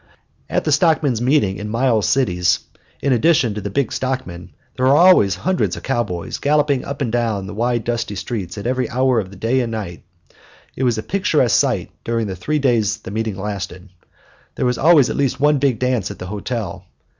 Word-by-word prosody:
At -, -, 0 dB
the -, -, 0 dB
stockmen's 145 Hz, -, +2 dB
meeting 120 Hz, -7 st, +2 dB
in 105 Hz, +1 st, -6 dB
Miles 115 Hz, -2 st, +1 dB
City, 95 Hz, -10 st, +1 dB, 0.6 s
in 140 Hz, -, +3 dB
addition 125 Hz, -2 st, +3 dB
to 105 Hz, -, -5 dB
the 100 Hz, -, -4 dB
big 120 Hz, +4 st, -1 dB
stockmen, 130 Hz, -10 st, -4 dB, 0.3 s
there 130 Hz, -, +1 dB
were 135 Hz, -, +5 dB
always 170 Hz, -, +6 dB
hundreds 185 Hz, -, -1 dB
of -, -, -9 dB
cowboys 105 Hz, -10 st, -2 dB
galloping 145 Hz, -2 st, +1 dB
up 140 Hz, 0 st, -6 dB
and 120 Hz, -, -2 dB
down 115 Hz, -5 st, -1 dB
the -, -, -7 dB
wide 120 Hz, +2 st, 0 dB
dusty 120 Hz, -3 st, -2 dB
streets 100 Hz, -2 st, -5 dB
at 100 Hz, -, -6 dB
every 125 Hz, -1 st, -1 dB
hour 130 Hz, -1 st, +2 dB
of 95 Hz, -4 st, -4 dB
the 100 Hz, -, -12 dB
day 115 Hz, +7 st, 0 dB
and 120 Hz, -3 st, -2 dB
night. 100 Hz, -6 st, -5 dB, 0.7 s
It 130 Hz, -, -1 dB
was 120 Hz, -3 st, +1 dB
a 110 Hz, -, -3 dB
picturesque 155 Hz, -, +1 dB
sight -, -, 0 dB
during 115 Hz, -1 st, -1 dB
the 95 Hz, -2 st, -4 dB
three 150 Hz, -, -2 dB
days 115 Hz, -6 st, +1 dB
the 105 Hz, -, -10 dB
meetings 110 Hz, -2 st, -3 dB
lasted. 100 Hz, -2 st, -6 dB, 0.7 s
There -, -, -1 dB
was 125 Hz, -1 st, 0 dB
always 155 Hz, -4 st, +5 dB
at -, -, -3 dB
least 135 Hz, -2 st, 0 dB
one 145 Hz, 0 st, +3 dB
big 130 Hz, -4 st, +1 dB
dance 125 Hz, -5 st, 0 dB
at -, -, -8 dB
the -, -, -7 dB
hotel. 105 Hz, 0 st, -5 dB
120 Hz, 200 wpm, -19 LUFS, 105-135 Hz, 0.7 s, always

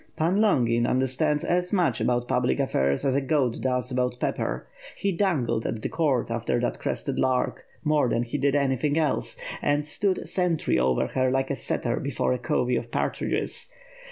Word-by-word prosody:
"Pan 170 Hz, +5 st, +1 dB
liongin 120 Hz, -, +3 dB
understands 130 Hz, +4 st, +1 dB
as 180 Hz, 0 st, 0 dB
much 175 Hz, -, +1 dB
about 120 Hz, 0 st, +1 dB
public 65 Hz, -, +1 dB
affairs 70 Hz, -, +1 dB
as 135 Hz, -, +2 dB
a 140 Hz, -, +2 dB
goat 135 Hz, -3 st, 0 dB
does 125 Hz, -1 st, 0 dB
about 125 Hz, -1 st, -1 dB
pepper. -, -, -2 dB, 0.4 s
lie 200 Hz, -, +3 dB
dangled 165 Hz, -, 0 dB
a| -, -, -1 dB
the 110 Hz, -, -4 dB
court 145 Hz, -8 st, 0 dB
after 115 Hz, +1 st, 0 dB
that 120 Hz, -, -2 dB
crested -, -, -2 dB
lark, 130 Hz, -1 st, 0 dB, 0.2 s
more 150 Hz, -5 st, +2 dB
than 115 Hz, -, +1 dB
he 120 Hz, +5 st, -3 dB
did 140 Hz, +1 st, +2 dB
anything 140 Hz, +1 st, +1 dB
else, 155 Hz, -4 st, +1 dB, 0.2 s
and 145 Hz, +1 st, +1 dB
stood 190 Hz, +5 st, +1 dB
sf*ntry 180 Hz, -, 0 dB
over 65 Hz, 0 st, +2 dB
her 130 Hz, -1 st, +1 dB
like 135 Hz, +1 st, 0 dB
a -, -, 0 dB
setter -, -, -1 dB
before -, -, -1 dB
a 125 Hz, -, -2 dB
covey 125 Hz, +1 st, 0 dB
of 115 Hz, -, -3 dB
partridges. -, -, -1 dB
130 Hz, 180 wpm, -26 LUFS, 120-155 Hz, 0.4 s, liongin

